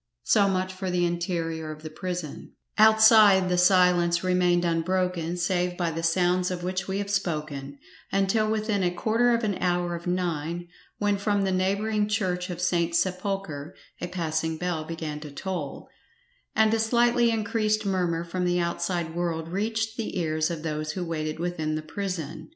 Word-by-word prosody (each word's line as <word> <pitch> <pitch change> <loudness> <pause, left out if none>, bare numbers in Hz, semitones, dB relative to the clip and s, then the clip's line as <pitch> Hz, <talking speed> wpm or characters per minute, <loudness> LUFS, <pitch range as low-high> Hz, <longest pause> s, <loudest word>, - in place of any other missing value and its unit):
So 200 -2 +4
much 185 0 -1
for 185 0 -4
the 180 -1 +1
interior 170 -2 -2
of 155 0 -10
the 155 - -7
prison; 175 -2 -6 0.2
outside 215 -3 +7
the 180 - +1
silence 180 -2 +4
remained 180 -1 +2
unbroken, 175 0 0
save 180 0 0
by 170 -2 0
the 165 +1 -4
sounds 180 +2 +2
of 180 -1 -4
which 185 +1 -2
we 190 0 -2
have 200 0 -3
spoken, 150 -7 -3 0.3
until 195 +3 +2
within 215 -2 0
a 180 - +2
quarter 225 +7 +1
of 235 0 +1
an 205 -3 -1
hour 175 -1 0
of 170 +1 -7
nine, 175 -1 -2 0.3
when 205 -1 +1
from 205 -1 +1
the 190 - 0
neighbouring 205 +3 +1
church 185 -3 -1
of 175 - -5
St. 170 -2 +1
Sepulchre 185 -4 -2 0.3
a 175 - -2
passing 160 -2 -2
bell 175 -2 -2
began 155 -2 -5
to 150 0 -8
toll, 155 0 -5 0.7
and 220 0 +4
a 225 - +2
slightly 235 +1 +3
increased 215 -1 0
murmur 175 -4 0
from 180 +2 -3
the 175 0 +1
outside 170 -1 -2
world 165 -2 -2
reached 220 +4 -2
the 225 -4 -3
ears 155 -2 0
of 165 -2 -5
those 155 -1 -3
who 180 0 -3
waited 155 -2 -3
within 160 -2 -2
the 155 - -4
prison. 180 - -5
180 Hz, 170 wpm, -26 LUFS, 165-195 Hz, 0.7 s, outside